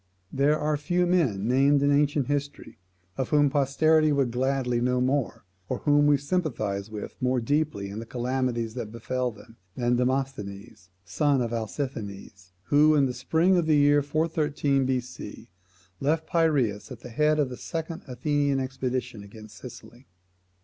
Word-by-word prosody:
There 145 +3 +3
are 150 0 0
few 175 +5 0
men 135 - +1
named 140 +3 +3
in 145 - +3
ancient 145 -1 +2
history, 145 -4 -4 0.4
of 130 - -2
whom 145 -2 +3
posterity 155 +3 +3
would 135 -4 +1
gladly 125 -1 0
know 125 +1 +1
more, 130 +1 -1 0.3
or - - -1
whom 145 0 +4
we 145 -1 +5
sympathise 125 - -2
with 105 -1 -8
more 125 0 +1
deeply 145 -4 -1
in 105 - -6
the 115 - -8
calamities 125 -2 -2
that 115 -3 -6
befel 125 +2 -2
them, 115 +1 -15 0.2
than 120 0 +1
Demosthenes, 120 -7 -3 0.2
the - - -17
son 145 -3 +2
of 120 -1 -2
Alcisthenes, 105 -6 -5
who, 150 +6 +4
in 140 -2 +4
the 125 - -2
spring 160 +9 +2
of 170 -2 +1
the 155 -2 +4
year 145 0 +5
413 145 -2 0
B.C., 125 -1 -5 0.5
left 160 +3 0
Piraeus 140 -11 +1
at 120 -2 -9
the 125 - -9
head 150 +5 +2
of 145 -4 +1
the 125 - -6
second 165 +4 -5
Athenian 140 +2 0
expedition 130 -3 -3
against 110 +1 -13
Sicily. 120 +2 -12
135 Hz, 160 wpm, -26 LUFS, 120-145 Hz, 0.5 s, we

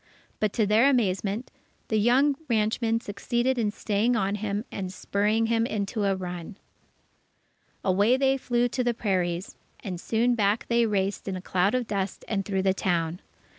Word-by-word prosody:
But 215 -2 +1
to 220 - +2
their 220 +6 +5
amazement, 210 -2 0 0.4
the 220 - +2
young 260 +6 +4
ranchman 225 +1 +1
succeeded 240 +5 -1
in 215 -3 +1
staying 215 +3 0
on 200 -2 0
him 205 +1 -2
and 190 -2 -4
spurring 210 +4 0
him 230 0 +1
into 205 0 -2
a 195 -1 +2
run. 180 +1 -6 1.3
Away 205 +7 +3
they 270 0 +3
flew 245 -2 +1
to 250 +1 -1
the 240 -1 0
prairies, 185 -4 -1 0.3
and 180 -3 -5
soon 235 +2 +1
back 210 -1 +1
they 235 -1 +3
raced 200 -1 -1
in 195 - -2
a - - -4
cloud 185 +4 +1
of 250 -1 0
dust 200 -3 -3
and 195 -3 -1
through 190 -2 -1
the 190 -1 +3
town. 175 -2 -1
210 Hz, 170 wpm, -26 LUFS, 195-235 Hz, 1.3 s, their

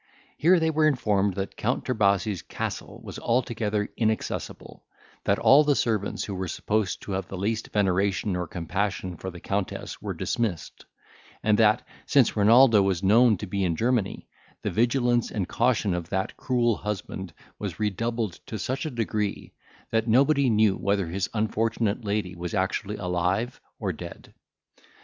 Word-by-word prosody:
Here 175 +4 +4
they 160 0 +1
were 155 0 +3
informed 105 -8 +1
that 95 0 -4
Count 125 +4 -1
Trebasi's 100 -5 +1
castle - - -5
was - - -7
altogether 115 -3 0
inaccessible; 110 -1 -3 0.4
that - - +3
all 140 +3 +6
the 145 -1 +2
servants 110 -6 -1
who 100 - -5
were 95 0 -3
supposed 105 +3 -1
to - - -6
have 95 0 -2
the 95 - -6
least 110 +4 -2
veneration 95 0 +1
or 90 -1 -2
compassion 95 +2 -3
for 95 +4 -6
the 90 -1 -10
Countess 100 +2 -3
were - - -4
dismissed; 110 -9 -3 0.6
and 105 0 +3
that, 110 +3 +4 0.2
since 135 -4 +4
Renaldo 115 +1 +6
was 95 -1 0
known 110 +2 +5
to 105 - -5
be 100 0 -2
in 85 -3 +1
Germany, 115 -1 0 0.4
the - - -1
vigilance 120 0 +2
and 95 -4 -2
caution 110 -6 +1
of 85 -1 -4
that 95 0 -2
cruel 120 -3 +1
husband 95 -3 -5 0.3
was - - -5
redoubled 110 0 -2
to 110 - -4
such 130 - -2
a - - -2
degree, 110 -5 -3 0.4
that 115 0 +1
nobody 135 +3 +4
knew 110 -3 +3
whether 100 -4 0
his 95 +2 -2
unfortunate 110 +1 0
lady 100 -3 -1
was 85 +3 -5
actually 100 +2 -1
alive 90 +5 -1 0.2
or 95 -5 -2
dead. 85 +2 -10
105 Hz, 160 wpm, -26 LUFS, 95-115 Hz, 0.6 s, all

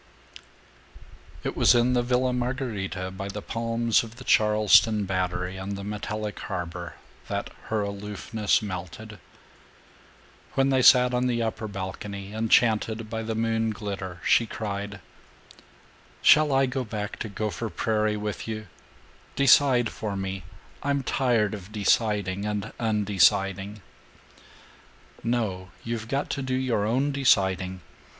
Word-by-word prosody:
VII - - -1
It - - -16
was - - +5
in 120 +1 +3
the 125 - +3
Villa 125 +1 +1
Margherita, 115 -7 -3
by 95 +1 -6
the 100 +1 -5
palms 115 0 +1
of 115 0 -10
the 130 - -11
Charleston 105 -1 +4
Battery 90 0 -2
and 95 +1 -4
the 100 - -6
metallic 105 +1 -4
harbor, 90 -3 -5 0.3
that - - -3
her 110 -1 -1
aloofness 105 +2 -1
melted. 100 +2 -7 1.4
When 135 0 +3
they 130 -1 +3
sat 125 0 +6
on 125 +1 +1
the 120 -2 0
upper 110 -1 -3
balcony, 100 0 -6
enchanted 110 0 +2
by 115 0 -2
the 110 0 -3
moon 115 0 0
glitter, 100 -4 -5
she 115 - +4
cried, 100 -2 -5 1.2
"Shall 150 0 +6
I 135 0 +4
go 130 0 -2
back 105 -2 -5
to 110 - -4
Gopher 110 +2 -3
Prairie 105 +3 0
with 105 +1 -4
you? 110 -1 -4 0.7
Decide 135 -3 +5
for 105 -3 -4
me. 95 -1 -4 0.4
I'm 140 -1 0
tired 120 -6 +1
of 100 -1 -8
deciding 105 -2 +1
and 105 0 -3
undeciding." 100 -2 +1 1.4
"No. 105 -6 -1
You've 115 -1 -4
got 135 +4 -2
to 140 - -2
do 130 -1 -1
your 120 -5 0
own 135 +6 +1
deciding. 95 -9 +2
110 Hz, 130 wpm, -26 LUFS, 100-120 Hz, 1.4 s, sat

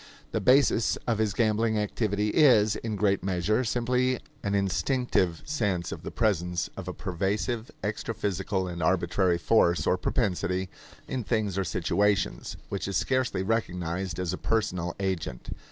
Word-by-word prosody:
The - - -1
basis 130 -3 +4
of 115 -3 0
his 105 -3 0
gambling 110 0 +2
activity 105 0 0
is, 110 -6 +5
in 110 -2 -4
great 100 -2 +1
measure, 95 +5 +1
simply 125 +2 +1 0.2
an 100 0 -1
instinctive 100 - 0
sense 105 - -1
of - - -6
the - - -6
presence 90 -6 0
of - - -7
a - - -3
pervasive 100 +6 -2
extraphysical 100 -3 -2
and 85 -1 -5
arbitrary 90 +1 +2
force 85 -1 +3
or 90 - +2
propensity 95 -3 0 0.4
in 130 -2 -3
things 110 -4 0
or 95 - 0
situations, 95 +4 0
which 100 - -3
is 100 - 0
scarcely 130 -7 0
recognized 90 -4 -2
as 90 -1 -2
a - - -4
personal 90 -6 -1
agent. 95 -10 -3
100 Hz, 145 wpm, -27 LUFS, 90-115 Hz, 0.4 s, is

